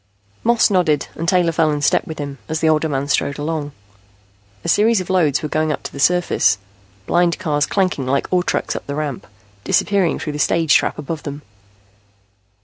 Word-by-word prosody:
Moss 235 -2 +3
nodded 170 -6 +1
and 165 +1 -2
Taylor 180 -2 +3
fell 160 -1 +2
in 150 -1 -1
step - - +2
with 160 - -6
him, 140 -2 -6
as 160 0 -1
the 160 - +1
older 155 0 +2
man 140 -1 -2
strode 140 -1 0
along. 150 -1 -3 0.9
A - - -5
series 220 +1 +3
of 185 0 -4
loads 155 -7 +2
were - - -1
going 155 +1 0
up - - -4
to - - -6
the 140 - -8
surface, 160 - +3 0.5
blind 175 -1 +2
cars 150 -5 0
clanking 185 -9 0
like 140 +2 +1
ore 180 - +4
trucks - - -2
up - - -6
the 140 - -4
ramp, 145 -4 -4 0.4
disappearing 195 -4 +1
through 150 - -5
the 150 - -5
stage 160 0 +2
trap - - +2
above 155 +2 -5
them. 145 0 -7
155 Hz, 195 wpm, -19 LUFS, 145-175 Hz, 0.9 s, ore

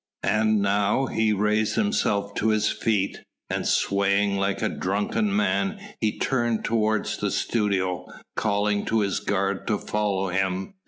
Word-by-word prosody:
And 110 -1 +2
now 100 +6 +2
he 110 -3 +1
raised 105 +1 +1
himself 105 - 0
to 110 - -1
his 110 -1 +2
feet, 100 -3 -1 0.3
and - - -1
swaying 100 0 +2
like 100 0 -1
a - - +3
drunken 105 - -1
man 205 0 +1 0.2
he 110 -2 0
turned 120 -4 0
toward 110 -2 +1 0.2
the - - +1
studio, 95 -5 -1 0.3
calling 105 -1 +1
to 110 -1 +1
his 100 -2 0
guard 100 -1 -1
to 105 - +1
follow 100 -2 -1
him. 95 - -1
105 Hz, 145 wpm, -25 LUFS, 100-110 Hz, 0.3 s, a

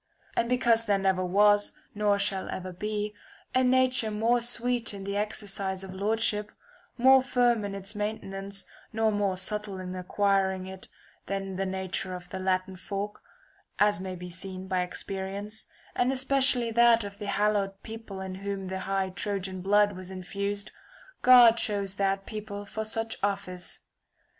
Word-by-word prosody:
And 235 - +1
because 235 -2 +3
there 200 -1 +3
never 190 -1 +1
was, 205 +3 +4 0.2
nor 205 -1 +2
shall 200 -1 0
ever 185 0 -5
be, 210 +2 -3 0.4
a 255 0 +4
nature 255 -2 +3
more 225 +3 +2
sweet 240 -2 -1
in 195 - -7
the 200 +1 -3
exercise 200 -2 -1
of 190 -1 -8
lordship, 210 +1 0 0.5
more 265 +2 +7
firm 245 -3 +2
[1003 - - -4
in 200 - -5
its 195 +1 -6
maintenance, 200 -2 -3 0.3
nor 220 0 +2
more 200 -3 0
subtle 210 +1 -2
in 185 0 -5
acquiring 190 0 +1
it 190 0 -8 0.4
than 195 -1 -3
the 195 +1 -1
nature 190 0 -3
of 180 -1 -9
the 190 - -4
Latin 185 0 0
folk, 200 +2 -5 0.6
(as 205 -3 +3
may 185 -1 -4
be 180 0 -8
seen 185 +1 -7
by 185 -1 +1
experience), 195 +3 -5 0.3
and 245 +1 +2
especially 265 -2 +2
that 235 0 +5
of 200 0 -8
the 205 - -5
hallowed 200 -1 0
people 220 -3 -8
in 190 -1 -5
whom 195 0 -4
the 190 0 -3
high 190 0 -1
Trojan 190 0 -3
blood 205 +2 +4
was 185 0 -8
infused, 200 +2 -4 0.5
God 245 -2 +8
chose 200 -3 0
that 195 0 0
people 205 -1 -6
for 220 +2 -4
such 225 +1 -1
office. 195 -3 -3
200 Hz, 160 wpm, -28 LUFS, 190-220 Hz, 0.6 s, God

